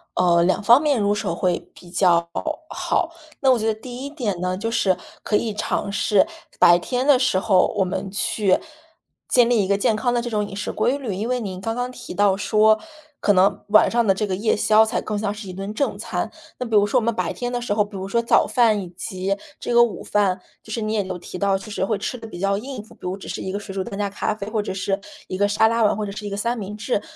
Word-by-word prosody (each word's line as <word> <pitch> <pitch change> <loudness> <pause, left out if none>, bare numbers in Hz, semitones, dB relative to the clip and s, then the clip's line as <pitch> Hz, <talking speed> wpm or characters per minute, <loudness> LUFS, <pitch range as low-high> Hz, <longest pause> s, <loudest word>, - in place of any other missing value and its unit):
呃， 175 -2 +4
2 185 +4 +2
方 240 +7 +7
面 290 -5 +2
入 205 0 +2
手 170 -4 -2
会 180 0 0
比 175 - -15
较 170 -2 +3 0.4
好。 335 - -1 0.3
那 265 -2 +5
我 250 - +3
觉 220 - -1
得 220 - +2
第 250 +2 -7
一 - - -5
点 235 - -3
呢， 180 0 -1
就 225 +4 -2
是 190 -5 +2 0.3
可 210 - 0
以 220 0 0
尝 200 - -2
试 205 0 +3 0.3
白 175 0 +7
天 250 +7 -2
的 280 -3 +5
时 255 -7 +2
候， 190 -2 +3
我 195 - +4
们 185 +1 -3
去 200 -1 +1 0.7
建 245 -2 +4
立 230 -4 +3
一 - - -2
个 200 0 +2
健 215 +2 +2
康 240 +2 0
的 240 - +1
这 240 - -4
种 210 -2 -1
饮 195 - -8
食 200 - -3
规 270 - +1
律， 250 -8 -4
因 205 +5 -3
为 250 0 0
您 190 -4 -5
刚 225 +3 -2
刚 245 +1 -2
提 250 - -9
到 200 0 +3
说 215 +2 +4 0.4
可 205 - +3
能 195 +2 +2
晚 215 - +6
上 235 0 +2
的 195 - +4
这 210 +3 -1
个 190 - -1
夜 210 +4 +1
宵 215 +1 +5
才 220 - -1
更 210 - -3
像 205 -1 -1
是 205 -2 -8
一 - - -6
顿 195 +3 -5
正 280 +6 -1
餐， - - -3 0.3
那 250 - -2
比 225 -2 -1
如 205 -1 +6
说 255 - +3
我 - - -4
们 235 +1 +1
白 185 -4 -2
天 245 0 -4
的 245 - -1
时 235 -3 -1
候， 210 0 +3
比 205 -1 -9
如 190 0 -5
说 235 +4 +1
早 235 - +4
饭 225 -4 +3
以 185 - -7
及 185 +2 -3 0.2
这 240 - -3
个 235 0 +7
午 235 -4 -2
饭， 200 -3 +1 0.2
就 220 - -11
是 230 - -2
你 215 0 -1
也 210 -2 +1
有 185 -1 -5
提 180 - -8
到 195 0 +2
就 195 +3 -10
是 205 - -2
会 205 +2 0
吃 225 +5 -4
得 225 - -9
比 175 - -9
较 195 +1 +1
应 255 +1 -6
付， 215 - -17
比 - - -24
如 180 +1 -3
只 195 - -11
是 - - -4
1 190 - -4
个 200 - -3
水 200 -1 -8
煮 190 - -1
蛋 195 - -7
加 205 -1 0
咖 205 - -2
啡， 200 -2 -7
或 220 -1 0
者 205 - -4
是 195 +1 -2 0.3
1 185 - -4
个 205 +1 +3
沙 210 +2 +3
拉 230 0 +2
碗， 210 - +3
或 215 - -2
者 200 - -5
是 210 +1 -7
1 - - -3
个 200 - -4
三 235 +3 -1
明 210 -1 -6
治， 225 -1 -1
210 Hz, 290 characters per minute, -22 LUFS, 195-230 Hz, 0.7 s, 方